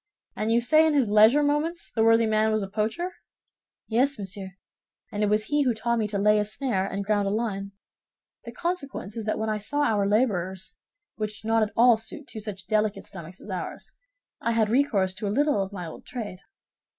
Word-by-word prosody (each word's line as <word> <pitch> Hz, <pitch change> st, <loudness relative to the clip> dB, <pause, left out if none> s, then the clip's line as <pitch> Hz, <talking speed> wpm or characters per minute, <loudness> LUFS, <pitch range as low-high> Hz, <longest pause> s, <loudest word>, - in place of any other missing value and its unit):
And 215 Hz, +1 st, -1 dB
you 235 Hz, +1 st, +4 dB
say 310 Hz, +6 st, +5 dB
in 310 Hz, -, +2 dB
his 250 Hz, -7 st, +2 dB
leisure 220 Hz, +8 st, +6 dB
moments 305 Hz, +4 st, -1 dB
the 220 Hz, -, +1 dB
worthy 225 Hz, 0 st, +5 dB
man 220 Hz, 0 st, +2 dB
was 215 Hz, -1 st, +1 dB
a -, -, -4 dB
poacher?" 225 Hz, -, -2 dB, 0.7 s
"Yes, 260 Hz, +5 st, +2 dB
monsieur, 195 Hz, -1 st, -4 dB, 0.6 s
and 210 Hz, -1 st, -3 dB
it 210 Hz, -, +3 dB
was 210 Hz, +1 st, +2 dB
he 295 Hz, +6 st, +1 dB
who 250 Hz, -4 st, +2 dB
taught 235 Hz, +1 st, 0 dB
me 215 Hz, -, 0 dB
to 205 Hz, -1 st, -3 dB
lay 210 Hz, +1 st, +4 dB
a -, -, +2 dB
snare 210 Hz, -3 st, -1 dB
and 200 Hz, 0 st, -4 dB
ground 205 Hz, -1 st, +1 dB
a -, -, +1 dB
line. 200 Hz, -2 st, -2 dB, 0.7 s
The 235 Hz, -, -8 dB
consequence 275 Hz, -, -4 dB
is 225 Hz, -2 st, -4 dB
that 215 Hz, -, -1 dB
when 220 Hz, 0 st, -2 dB
I 215 Hz, -, -1 dB
saw 280 Hz, +8 st, -1 dB
our 210 Hz, -7 st, +2 dB
laborers, 190 Hz, -5 st, 0 dB, 0.4 s
which 215 Hz, 0 st, -4 dB
did 220 Hz, -, -4 dB
not 225 Hz, 0 st, +3 dB
at 215 Hz, -1 st, 0 dB
all 235 Hz, -1 st, +6 dB
suit 285 Hz, +7 st, -8 dB
two 220 Hz, -, -7 dB
such 205 Hz, -3 st, -7 dB
delicate 215 Hz, +1 st, 0 dB
stomachs 180 Hz, -1 st, -9 dB
as 205 Hz, -, -9 dB
ours, 180 Hz, -2 st, -6 dB, 0.5 s
I 230 Hz, -, 0 dB
had 220 Hz, -2 st, +2 dB
recourse 225 Hz, -8 st, +2 dB
to 210 Hz, +2 st, -4 dB
a -, -, 0 dB
little 285 Hz, 0 st, +2 dB
of 195 Hz, 0 st, -4 dB
my 180 Hz, -3 st, -6 dB
old 160 Hz, -, -9 dB
trade. 215 Hz, -7 st, -6 dB
215 Hz, 215 wpm, -26 LUFS, 200-240 Hz, 0.7 s, leisure